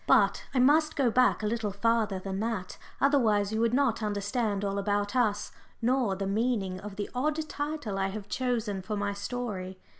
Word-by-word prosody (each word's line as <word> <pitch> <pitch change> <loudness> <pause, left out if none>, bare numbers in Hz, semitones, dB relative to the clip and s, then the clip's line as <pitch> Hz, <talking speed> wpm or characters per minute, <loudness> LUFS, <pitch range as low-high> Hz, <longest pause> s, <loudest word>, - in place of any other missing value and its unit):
But - - +4
I - - -2
must 300 +5 +4
go 260 -5 +2
back 250 -2 +3
a - - 0
little 220 0 -1
farther 215 0 +1
than 190 +1 -4
that, 220 -4 -3 0.2
otherwise 220 -7 +3
you 220 - 0
would 230 0 +3
not 255 -3 +2
understand 205 0 -1
all 200 0 -1
about 205 +2 -1
us, 215 -5 +1 0.3
nor 240 -4 +1
the 195 +1 -3
meaning 200 -2 0
of 205 0 -8
the 205 0 -3
odd 305 +5 -1
title 290 -11 -3
I 195 - +1
have 200 +1 -6
chosen 225 -5 -1
for 210 +3 -4
my 200 0 -1
story. 200 -4 -4
215 Hz, 185 wpm, -29 LUFS, 200-245 Hz, 0.3 s, But